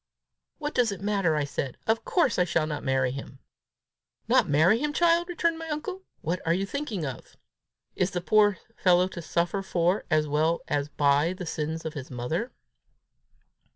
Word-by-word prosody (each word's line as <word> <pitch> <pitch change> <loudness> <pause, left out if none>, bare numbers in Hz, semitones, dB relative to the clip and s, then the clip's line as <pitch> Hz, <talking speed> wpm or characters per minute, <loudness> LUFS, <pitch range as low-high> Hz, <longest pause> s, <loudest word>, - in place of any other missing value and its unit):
"What 300 -1 -4
does 245 -4 +2
it 195 - -5
matter?" 195 -6 +1
I 150 - +1
said. 140 -2 -4
"Of 225 +1 +1
course 335 - +2
I - - +5
shall 165 -2 +1
not 150 -2 -4
marry 130 -2 +1
him!" 135 0 -8 0.9
"Not - - +3
marry 160 +10 +4
him, 295 +2 -1
child!" 340 +1 +3
returned 335 -1 0
my 325 0 -6
uncle. 340 +6 -4 0.2
"What 175 +3 -2
are 165 +1 +2
you 195 +2 -1
thinking 220 - -3
of? 130 -4 -8 0.6
Is 185 - +1
the 180 - -2
poor 205 +1 +4 0.2
fellow 180 0 +4
to 175 - -7
suffer 170 +4 -1
for, 180 0 0
as 155 -1 +2
well 155 +3 +1
as 145 0 -1
by 145 +4 +2
the 180 -1 -7
sins 160 0 -3
of 160 - -3
his 140 -4 -7
mother?" 155 - -3
175 Hz, 180 wpm, -27 LUFS, 150-220 Hz, 0.9 s, I